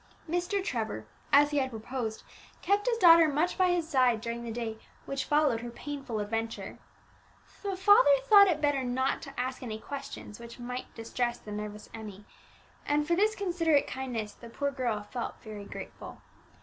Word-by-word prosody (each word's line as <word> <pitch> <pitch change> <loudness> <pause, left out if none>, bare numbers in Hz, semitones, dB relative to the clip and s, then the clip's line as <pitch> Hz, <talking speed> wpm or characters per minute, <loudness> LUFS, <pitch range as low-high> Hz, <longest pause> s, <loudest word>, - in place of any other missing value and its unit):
Mr. 355 +4 -1
Trevor, 220 - -3 0.3
as 290 +1 +6
he 290 - +2
had 260 -1 0
proposed, 225 -1 -5 0.4
kept 405 +3 +2
his 475 -2 +2
daughter 335 -5 +8
much 310 +4 +1
by 370 -1 +3
his 350 -2 +1
side 255 -7 +3
during 235 +1 -4
the 235 - -5
day 225 -1 -4 0.3
which 275 0 -3
followed 295 -6 +3
her 240 - -6
painful 270 -2 -5
adventure. 225 +2 -4 0.8
The 395 -2 -3
father 410 +6 +6
thought 410 -5 +8
it 320 -5 +1
better 290 -2 +2
not 255 +2 0
to - - -8
ask 255 +1 -2
any 225 -4 -4
questions 275 -4 -8
which 235 0 -10
might 250 +1 -6
distress 240 +1 -2
the 210 - -11
nervous 210 0 -6
Emmie, 210 -2 -9 0.6
and 295 0 +1
for 340 - +2
this 425 +4 +2
considerate 335 -6 +2
kindness 240 -5 -4
the 235 - -12
poor 280 +4 -2
girl 240 -6 -2
felt 235 +3 -5
very 210 -3 -8
grateful. - - -9
260 Hz, 175 wpm, -30 LUFS, 225-325 Hz, 0.8 s, daughter